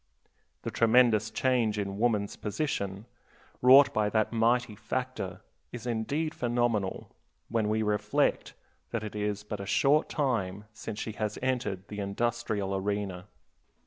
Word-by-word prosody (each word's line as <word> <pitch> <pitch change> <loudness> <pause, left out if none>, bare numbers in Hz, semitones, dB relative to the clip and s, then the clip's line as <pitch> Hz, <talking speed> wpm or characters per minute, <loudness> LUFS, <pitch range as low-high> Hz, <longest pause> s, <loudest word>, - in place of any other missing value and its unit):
The - - -3
tremendous 115 -2 +4
change 115 -2 +1
in 100 -1 -3
woman's 105 -4 +1
position, 100 -4 -3 0.6
wrought 135 +3 +8
by 105 -1 +2
that 110 +1 +1
mighty 115 +1 +2
factor, 110 -3 -4 0.3
is 120 -1 -7
indeed 140 +7 -1
phenomenal 120 -5 -1 0.4
when 110 -2 0
we 110 +1 +1
reflect 105 -1 0 0.3
that 115 -2 -3
it 105 -1 -6
is 105 0 -2
but 105 -1 -5
a 100 - -6
short 145 +8 +3
time 105 - -1
since 110 -1 -7
she 110 - -3
has 105 0 -3
entered 120 -7 -1
the 105 - -7
industrial 105 -1 -1
arena. 95 -1 -3
110 Hz, 135 wpm, -29 LUFS, 105-120 Hz, 0.6 s, wrought